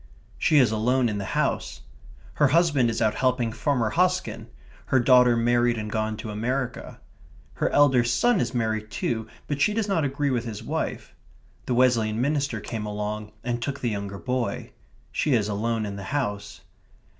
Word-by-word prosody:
She 155 - +3
is 125 -6 +5
alone 120 +3 +1
in 105 -1 -3
the 100 - -4
house. - - -1 0.5
Her 145 - +3
husband 145 -5 +3
is 115 - -1
out 110 - +2
helping 125 -3 0
Farmer 125 -4 0
Hosken; 180 +4 0 0.4
her 130 - +3
daughter 125 -1 +5
married 120 0 +2
and 105 -1 -4
gone 110 0 -1
to 110 - -6
America. 125 +4 -3 0.5
Her - - 0
elder 135 -4 +4
son 125 - +2
is 120 -2 -1
married 110 -2 -1
too, 110 +2 -2 0.2
but 145 -1 -3
she 210 +5 +3
does 225 -2 0
not 190 -6 +1
agree 140 0 -1
with 120 -2 0
his 110 -3 -6
wife. - - -4 0.5
The 125 - 0
Wesleyan 115 -3 +2
minister 140 -3 0
came 105 0 -5
along 105 0 -4
and 120 -1 -2
took 140 +3 -3
the 120 - 0
younger 100 -1 -4
boy. 125 +7 -3 0.4
She 145 -4 +1
is 105 -3 +1
alone 110 +2 -1
in 100 -1 -5
the 100 - -7
house. 105 -8 -3
120 Hz, 175 wpm, -25 LUFS, 110-135 Hz, 0.5 s, is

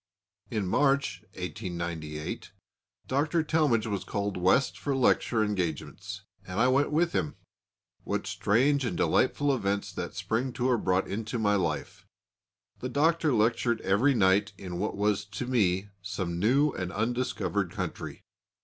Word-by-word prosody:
In 105 -4 -1
March, 140 +7 +2
1898, 85 -5 -5 0.5
Dr. 155 +5 +1
Talmage 150 -9 +2
was 100 -3 -2
called 100 -1 -2
West 95 +9 +3
for 140 -2 -1
lecture 120 -3 +3
engagements, 90 -7 -3 0.2
and 90 +3 -4
I 125 - +5
went 140 +3 +2
with 165 +3 +2
him. 150 - -1 0.7
What - - -2
strange 135 +7 +2
and 115 -8 -2
delightful 145 -1 +2
events 100 -3 -2
that - - -5
spring 125 +3 -1
tour 125 -1 +1
brought 95 -1 +1
into 110 +4 -3
my 105 -2 +2
life! 95 -4 -2 0.7
The 130 - -4
Doctor 160 +3 +2
lectured 115 0 +2
every 115 +9 +3
night 95 -1 +3
in 90 -3 -6
what 105 0 -2
was 105 0 +1
to 105 +4 -5
me 100 -6 +1
some 95 -3 -3
new 135 +9 +3
and 90 -5 -4
undiscovered 115 -3 -1
country. - - -5
110 Hz, 140 wpm, -29 LUFS, 95-130 Hz, 0.7 s, I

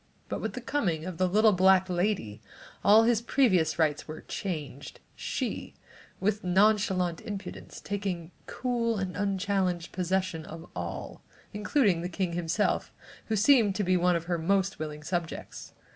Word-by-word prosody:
But - - -3
with - - -3
the - - -5
coming 175 - -1
of 185 -3 -6
the 185 - +3
little 215 +3 +5
black 190 0 +5
lady 175 - -1 0.4
all 215 +2 +7
his 230 -1 +3
previous 185 - +2
rights 155 -3 +1
were 155 0 -7
changed, 150 -8 -6 0.2
she, - - -4 0.4
with 210 +2 0
nonchalant 190 -2 +2
impudence, 205 -4 -7
taking 190 -4 -4 0.2
cool 235 -3 -1
and 190 -2 -3
unchallenged 195 -3 -1
possession 185 -2 -1
of 165 +2 -9
all, - - -5 0.3
including 210 - +2
the 175 - -3
king 180 -1 -2
himself, 175 +4 0 0.4
who 220 - 0
seemed 215 -2 +4 0.2
one 180 0 +3
of 165 - -1
her 175 -1 -1
most 195 +3 +1
willing 150 -1 -5
subjects. 170 0 -5
185 Hz, 145 wpm, -28 LUFS, 170-205 Hz, 0.4 s, all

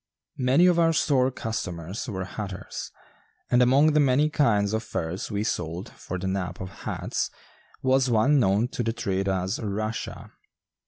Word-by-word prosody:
Many 130 +7 +4
of 175 -2 +4
our 165 -1 +4
store 135 -5 +3
customers 95 -5 -4
were 95 -3 -3
hatters, 95 -1 -6 0.6
and 125 - +5
among 135 +5 +5
the 150 - +4
many 145 +2 +3
kinds 105 -9 +2
of 110 - 0
furs 90 -4 -4
we 105 -1 -1
sold 85 -4 -3
for 95 - -6
the 90 - -5
nap 95 -2 -2
of 95 - -5 0.2
hats - - -2 0.5
was 130 0 +3
one 125 +6 +4
known 105 0 +3
to - - -3
the 115 -1 0
trade 100 -4 -1
as 95 +1 -1
"Russia." 110 +1 -4
110 Hz, 160 wpm, -26 LUFS, 95-130 Hz, 0.6 s, and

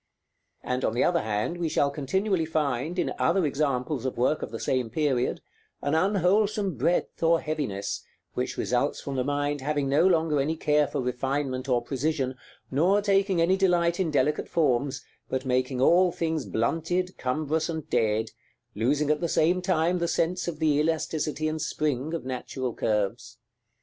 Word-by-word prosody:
And 125 +1 -2
on 110 - 0
the 125 - +2
other 170 -1 +2
hand, 110 +10 -2
we 170 -2 0
shall 140 -1 +2
continually 165 +5 0
find, 155 +1 -1
in - - 0
other 175 +1 +2
examples 140 -2 -1
of 130 - -3
work 130 +6 +1
of - - -4
the 115 - -6
same 130 -3 0
period, 135 -2 0 0.4
an 145 - 0
unwholesome 195 +2 +2
breadth 160 +8 0
or 165 0 +4
heaviness, 140 -12 -3 0.3
which - - -3
results - - 0
from 140 - -5
the 130 - 0
mind 145 +1 -1
having 145 0 -1
no 145 +6 +4
longer 160 -4 +2
any 155 +4 -1
care 150 -1 +2
for - - -3
refinement 130 +1 -2
or 120 -2 +2
precision, 135 0 -1 0.4
nor 175 +9 +3
taking 195 -2 +2
any 170 +3 +4
delight 175 -3 +2
in 180 -4 +1
delicate 150 0 +1
forms, 140 -3 0 0.2
but 130 +1 -2
making 130 0 0
all 175 +7 +5
things 160 -4 -2
blunted, 165 +10 -1
cumbrous, 155 +5 -1
and 160 -2 -4
dead, 110 -2 +1 0.4
losing 140 +7 +1
at 150 - 0
the 170 - 0
same 175 +4 +2
time 175 -1 +1
the 170 - 0
sense 175 +2 0
of 170 -3 -3
the 150 -2 +2
elasticity 155 -1 -1
and 155 0 -2
spring 150 0 -1
of 165 - -5
natural 130 -1 -4
curves. 105 -3 -2
150 Hz, 170 wpm, -27 LUFS, 130-170 Hz, 0.4 s, all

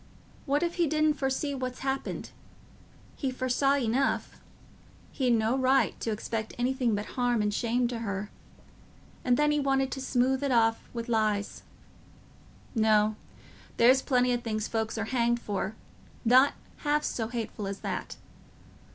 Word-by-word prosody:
What 285 +4 +2
if 340 +1 -2
he 340 -2 +3
didn't 310 0 +2
foresee 275 +1 -1
what's 255 -2 -4
happened? 270 0 -3 0.8
He 270 - -2
foresaw 255 +2 +1
enough; 265 +1 0 0.7
he'd 260 -3 0
no 225 +2 +1
right 265 +1 +3
to - - -3
expect 220 +1 -3
anything 245 -2 +1
but 205 +1 -3
harm 245 -1 0
and 210 0 0
shame 240 +2 +1
to 240 -2 -4
her. 200 -2 -4 0.9
And 245 -1 +3
then 295 0 +3
he 295 - +2
wanted 270 -1 +1
to 265 - -4
smooth 260 +1 +1
it 280 - 0
off 225 -2 +2
wi' 235 -1 -4
lies. 215 -3 0 1.1
No—there's 220 +3 +1
plenty 250 -2 +2
o' - - +2
things 220 -2 -3
folks 220 0 -2
are 220 - -1
hanged 235 0 +1
for 205 -1 -3 0.5
not 255 +4 +6 0.2
half 300 0 0
so 225 -6 -2
hateful 225 -3 -4
as 195 0 -5
that. - - -4
245 Hz, 145 wpm, -28 LUFS, 220-270 Hz, 1.1 s, not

